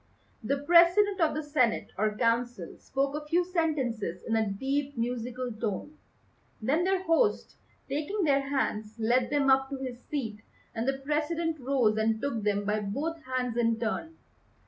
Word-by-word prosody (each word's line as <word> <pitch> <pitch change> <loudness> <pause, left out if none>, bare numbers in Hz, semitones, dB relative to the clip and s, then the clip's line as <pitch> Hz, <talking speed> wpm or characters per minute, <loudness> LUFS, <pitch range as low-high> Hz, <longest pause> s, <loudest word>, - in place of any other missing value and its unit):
The 275 +6 0
President 345 +6 +5
of 315 -2 +3
the 310 - -2
Senate 285 -6 +1
or 210 0 0
Council 235 -5 0
spoke 275 +1 -1
a 300 0 -5
few 345 +3 +2
sentences 265 - -1
in 225 - -1
a 220 -2 +1
deep 275 +6 -2
musical 245 +1 -3
tone. 220 +6 -4 0.6
Then 280 +10 +1
their 380 0 +1
host, 380 +6 +1 0.3
taking 315 +8 -2
their 275 -3 +2
hands, 215 -6 -1
led 240 +2 +2
them 285 -2 +3
up 265 0 +3
to 275 - -4
his 255 -2 -6
seat, 225 -8 -3 0.3
and 230 +2 -2
the 270 0 +1
President 315 +2 -1
rose 250 -5 +2
and 220 0 +1
took 255 -3 -2
them 205 -1 0
by 210 +1 +1
both 290 +11 -3
hands 255 -2 -2
in 230 -1 +2
turn. 280 +8 -3
265 Hz, 165 wpm, -29 LUFS, 225-300 Hz, 0.6 s, President